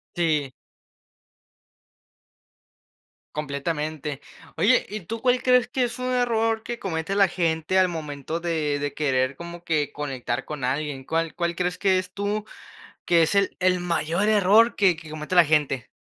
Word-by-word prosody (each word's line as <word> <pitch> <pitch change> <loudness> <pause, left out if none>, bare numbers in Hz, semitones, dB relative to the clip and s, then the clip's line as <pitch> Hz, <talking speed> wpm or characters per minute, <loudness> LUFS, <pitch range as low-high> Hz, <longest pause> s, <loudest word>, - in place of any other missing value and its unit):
Sí. 155 -6 0 2.8
Completamente. 150 0 -3 0.4
Oye, 240 +5 +4
¿y 210 +1 -5
tú 225 +6 -6
cuál 250 -1 +2
crees 250 -1 +4
que 250 -1 +1
es 240 +1 -6
un 255 0 -2
error 225 -2 +1
que 240 0 -5
comete 165 +1 -3
la 200 -2 +4
gente 165 +1 0
al 185 - +5
momento 155 -1 -5
de 160 -4 -1
de 145 -1 -3
querer 135 -2 0
como 170 0 -9
que 155 -4 -1
conectar 135 -3 -3
con 150 -4 -5
alguien? 135 0 -2
¿Cuál 165 +1 -1
cuál 170 -1 -2
crees 180 0 -1
que 190 -2 +3
es 185 0 -3
tú, 205 +2 -2 0.6
que 170 -1 +5
es 160 - +1
el 200 -1 +1
el 185 0 +2
mayor 175 +2 0
error 215 +3 +5
que 190 -4 +4
que 160 -1 -12
comete 155 +3 -5
la 175 -2 +7
gente? 145 -5 +1
170 Hz, 155 wpm, -24 LUFS, 150-200 Hz, 2.8 s, la